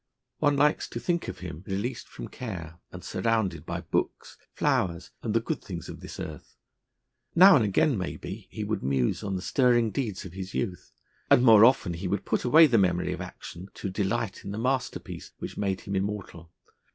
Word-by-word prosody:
One 145 -2 +3
likes 150 +2 +3
to - - -5
think 175 -1 -1
of - - -7
him 85 -2 -7
released 105 +6 -3
from - - -8
care, 85 -9 -7
and - - -9
surrounded 100 -9 -1
by 85 +1 -3
books, 85 - -2 0.2
flowers, 90 +1 0
and 115 -2 -2
the - - +5
good 115 - -3
things 85 -4 -7
of - - -8
this - - -9
earth. 75 -3 -8 0.8
Now 185 +3 +9
and 120 - +4
again, 105 +4 +2
maybe, 90 - -6
he - - -5
would - - -2
muse 65 -2 0
on 100 -2 -2
the 90 - -4
stirring 120 -4 +3
deeds 105 -4 -3
of 90 - -9
his 95 0 -7
youth, 95 -7 -3 0.4
and 125 - +6
more 110 -3 +8
often 115 -7 +4
he 90 +3 -4
would 95 +1 -2
put - - 0
away 155 +6 +7
the 120 -7 +4
memory 90 -2 +1
of - - -6
action 90 +3 -9
to 95 - -4
delight 100 +1 -2
in - - -6
the 100 - -4
masterpiece 130 +3 -3
which - - -7
made 95 -2 -1
him 100 -2 -4
immortal. 95 -4 -4
100 Hz, 195 wpm, -27 LUFS, 90-120 Hz, 0.8 s, Now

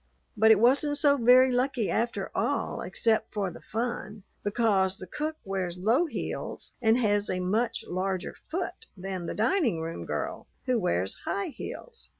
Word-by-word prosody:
But 220 +1 +5
it 220 -2 +7
wasn't 280 +5 +3
so 285 -1 +4
very 255 +1 +6
lucky 250 -3 +1
after 235 +1 -1
all - - -1
except 225 -1 0
for 200 -3 -2
the - - -11
fun, 220 -3 -4 0.2
because 200 -3 +2
the - - -8
cook 305 - -3
wears 185 -3 -2
low 230 - +2
heels - - -5
and 225 0 +4
has 205 -4 +2
a 185 - -1
much 215 +6 0
larger 185 0 -2
foot 370 +6 -5
than 185 -2 -4
the - - -4
dining 230 - +2
room 165 +1 -5
girl, - - -3 0.2
who 255 -3 +2
wears 95 - 0
high 200 - -1
heels. 465 - -9
220 Hz, 160 wpm, -28 LUFS, 190-250 Hz, 0.2 s, it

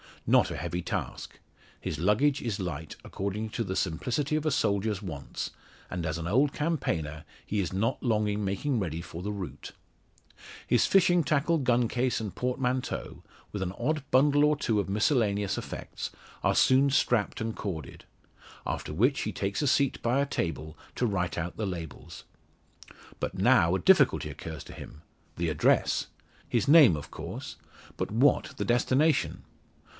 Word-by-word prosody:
Not - - +4
a - - -4
heavy 85 +1 -3
task. - - -5 0.4
His 75 - -4
luggage 125 - +2
is 110 -5 -3
light, 80 -4 -5
according 100 +3 -4
to 115 - -2
the 95 -3 -4
simplicity 125 - -1
of 155 0 -1
a 155 - +2
soldier's 105 -4 0
wants; 80 -9 -5 0.4
and 90 -2 -3
as 80 0 -2
an 85 0 -4
old 135 +9 +3
campaigner 85 - -2 0.2
he 105 - -1
is 95 -2 -2
not 110 +7 0
long 110 -4 +1
in 105 0 -1
making 110 +7 -1
ready 85 -4 -3
for 85 0 -8
the 105 +3 -3
route. 100 -4 -6 0.9
His - - +3
fishing 180 -3 +4
tackle, 155 +4 +2
gun 125 -3 +2
case 125 +2 0
and 105 -4 -5
portmanteau, 125 0 -2 0.3
with 100 - -4
an 95 -1 -2
odd 145 +7 -1
bundle 145 +2 +4
or 150 0 +4
two 115 -7 0
of 100 - -2
miscellaneous 105 -2 +1
effects, - - -6 0.3
are - - +2
soon 135 +2 +5
strapped 120 -6 +1
and 110 0 -2
corded. 85 -7 -6 0.6
After - - -3
which 125 - +2
he 110 - -2
takes 100 +4 -2
a 145 - +1
seat 140 0 +2
by 120 +3 +1
a 140 - +2
table 80 - -3 0.2
to 125 - 0
write 90 -7 -1
out 85 +1 -4
the 110 - -2
labels. 85 -5 -7 1.0
But - - -3
now - - +4
a - - 0
difficulty - - +4
occurs 80 -3 -7
to - - -11
him 75 - -11 0.4
the 85 0 0
address! 75 -2 +2 0.4
His 120 +3 0
name 145 - +8
of 75 - -8
course, - - -7 0.4
but - - -2
what 125 +7 +2
the - - -2
destination? 130 +6 +2
105 Hz, 165 wpm, -28 LUFS, 90-135 Hz, 1.0 s, name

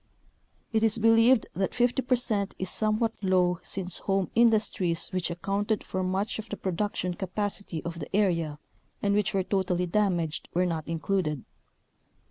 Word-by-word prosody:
It 220 - +3
is 225 0 +3
believed 225 +2 +5
that 190 +2 -2
50 245 +2 +2
percent 240 -6 +1
is 190 -1 -2
somewhat 220 +1 +1
low 180 -2 +2
since 185 -2 -1
home 195 -1 -1
industries 215 -7 +2
which 185 -2 -1
accounted 200 +5 -1
for 185 - -3
much 190 +4 -1
of 220 - -7
the 210 - -4
production 185 -1 -2
capacity 195 -2 -4
of 170 0 -5
the 155 +4 -5
area 165 -7 +1 0.5
and 200 0 +2
which 205 -1 +1
were 190 - +2
totally 180 -2 0
damaged 175 -4 0
were 180 +1 +3
not 165 -3 -3
included. 165 -3 -1
195 Hz, 150 wpm, -27 LUFS, 180-215 Hz, 0.5 s, believed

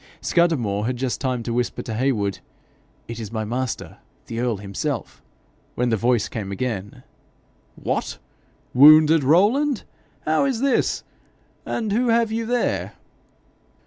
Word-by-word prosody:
Scudamore 120 - +1
had 125 0 -2
just 130 0 -2
time 130 -3 -1
to 115 - -3
whisper 120 0 -2
to 110 - -5
Heywood, 110 -5 0 0.7
'It 115 0 -6
is 110 -3 -6
my 110 -1 -3
master, 125 +2 -4 0.3
the 115 - -5
earl 120 -3 0
himself,' 105 +6 -4 0.5
when 125 0 0
the 115 - +2
voice 120 0 +1
came 100 -4 -5
again. 105 -2 -4 0.7
'What! - - -3 0.6
wounded, 155 +3 +7
Rowland? 215 - +3 0.4
How 155 - +2
is 265 -4 0
this? 275 -1 +1 0.6
And 220 -3 -2
who 240 +4 +1
have 230 -1 +2
you 225 0 -2
there?' 245 0 -1
130 Hz, 135 wpm, -22 LUFS, 115-175 Hz, 0.7 s, wounded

